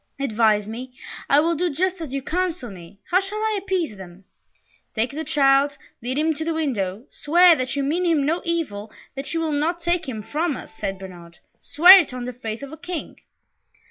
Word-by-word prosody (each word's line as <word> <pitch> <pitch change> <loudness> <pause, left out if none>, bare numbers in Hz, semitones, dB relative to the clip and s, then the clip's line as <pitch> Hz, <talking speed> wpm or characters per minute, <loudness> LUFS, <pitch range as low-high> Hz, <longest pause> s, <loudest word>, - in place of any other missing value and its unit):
Advise 215 -5 +2
me 250 +3 -8 0.3
I 280 - +6
will 330 +3 +2
do 350 +2 0
just 360 +4 -1
as 310 -5 -6
you 275 -1 -3
counsel 335 - -2
me 180 0 -13
how 365 - +5
shall 390 +2 -5
I 430 -1 0
appease 370 - -2
them?" 190 0 -12 0.7
"Take 225 +2 0
the 310 +3 -4
child, 280 -1 +3 0.2
lead 250 +3 -3
him 315 +1 +2
to 315 +1 -5
the 325 0 -2
window, 225 -9 -2
swear 345 +3 +5
that 255 -2 -3
you 280 - -1
mean 320 +6 0
him 320 -5 +2
no 330 +4 0
evil, 295 - -3 0.2
that 270 +3 -6
you - - +1
will 325 -1 -1
not 310 +4 0
take 345 -3 -1
him 220 -4 -5
from 305 +3 -2
us," - - -11
said 195 -3 -4
Bernard. 175 -3 -12 0.2
"Swear 360 +6 +8
it 285 -7 -2
on 245 -1 -5
the 250 - -5
faith 225 0 -6
of 280 - -8
a - - -8
King." 340 +1 -6
285 Hz, 205 wpm, -23 LUFS, 225-335 Hz, 0.7 s, Swear